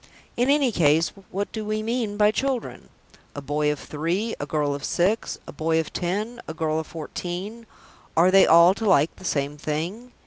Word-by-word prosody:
In 245 +3 +1
any 280 -3 +3
case 160 -3 +3 0.2
what 200 +2 -3
do 220 - -4
we 215 0 -2
mean 225 -2 -2
by 210 0 +5
"children"? 260 +2 -3 0.5
A - - -4
boy 150 +2 0
of 150 - -3
three, 175 +9 -2
a 145 - -4
girl 145 -1 0
of 140 -1 -6
six, 195 +6 0
a - - -8
boy 160 +2 0
of 160 - -4
ten, 210 +7 -3
a 160 - -6
girl 160 -1 -1
of 160 - -6
fourteen 180 +7 -6 0.5
are 175 +3 +5
they 195 0 +6
all 170 +3 +7
to 220 +3 -5
like 155 -3 +3
the - - -14
same 145 -2 -1
thing? 170 +12 -4
175 Hz, 195 wpm, -24 LUFS, 155-215 Hz, 0.5 s, all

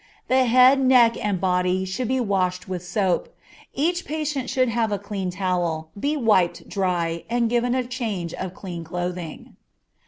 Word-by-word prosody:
The 260 0 +4
head, 255 +3 +6
neck, 250 -3 +5
and 205 -3 0
body 180 0 +1
should 195 +6 -3
be 260 +2 +1
washed 190 -5 0
with 180 -2 -4
soap; 190 - -1 0.4
each 345 +5 0
patient 295 -4 -3
should 255 -1 +2
have 230 -2 0
a 205 - 0
clean 200 -2 -4
towel, 175 -4 -2
be 285 +9 -1
wiped 210 -9 +2
dry, 175 -4 -1
and 235 -1 +1
given 245 +1 +1
a 255 - +1
change 220 -9 -4
of 185 0 -5
clean 175 -3 -7
clothing. 175 0 -5
200 Hz, 160 wpm, -23 LUFS, 180-250 Hz, 0.4 s, head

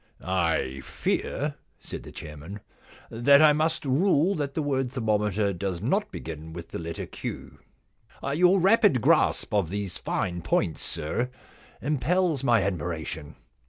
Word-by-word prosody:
* - - -38 0.3
I 65 -4 -1
fear/ 145 - -2 0.2
said - - -7
the - - -11
chairman, 80 +7 -9 0.3
* - - -22
that 140 +5 +5
I 155 -1 +7
must 155 +1 0
rule 165 +5 +3
that 145 -5 -3
the 155 - 0
word 135 -3 0
thermometer 105 -4 0
does 90 -1 -3
not 190 - 0
begin 80 0 -7
with 85 0 -8
the - - -5
letter 85 0 -5
Q.* - - -7 0.3
* 140 - -7
Your 180 +4 +5
rapid 195 - +5
grasp - - +3
of 100 -6 +2
these 100 -1 -3
fine 90 -1 -2
points, 80 - 0
sir, 120 +11 -2 0.5
impels 155 +2 +1
my 115 -6 +4
admiration. 80 -4 -4
115 Hz, 150 wpm, -27 LUFS, -, 0.5 s, I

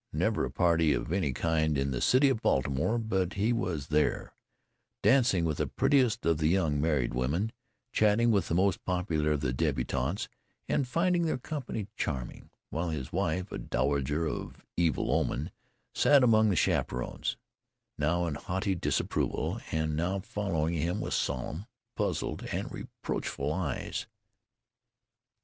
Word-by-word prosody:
Never - - +1
a - - -4
party 85 -3 +3
of - - -3
any 90 -8 +1
kind 80 +1 +1
in 70 0 0
the - - -2
city 130 +3 +5
of 115 -4 0
Baltimore 80 - +1
but 95 -5 -1
he 105 +4 +1
was 90 - -2
there, 75 0 +1 0.7
dancing 120 -10 +4
with 75 -3 -1
the - - +1
prettiest 130 -6 +2
of 80 -2 +2
the 80 - +2
young 80 -5 +2
married 70 -7 +1
women, 75 - 0 0.4
chatting 110 +2 +3
with 100 -3 +2
the 85 - 0
most 95 +1 +2
popular 85 -4 0
of 75 - -2
the 65 -3 0
débutantes, 65 - -1 0.4
and 135 - +1
finding 170 +4 +2
their 155 - 0
company 130 -6 -4
charming, 65 -5 -4 0.2
while 85 +2 -1
his 70 -6 -4
wife, 90 +4 -1
a - - -4
dowager 70 +5 0
of 75 - -5
evil 85 -3 +1
omen, 70 +5 0 0.4
sat 140 -2 +5
among 110 -3 +5
the 95 - +2
chaperons, 65 -6 0 0.6
now 85 +4 +1
in 80 - -2
haughty 95 +6 -2
disapproval, 85 - -1
and 80 -1 0
now 90 +5 0
following 95 -6 -1
him 85 +5 -1
with - - -3
solemn, 75 - -2 0.3
puzzled, - - -2
and - - -3
reproachful - - -4
eyes. - - -3
85 Hz, 150 wpm, -30 LUFS, 75-105 Hz, 0.7 s, city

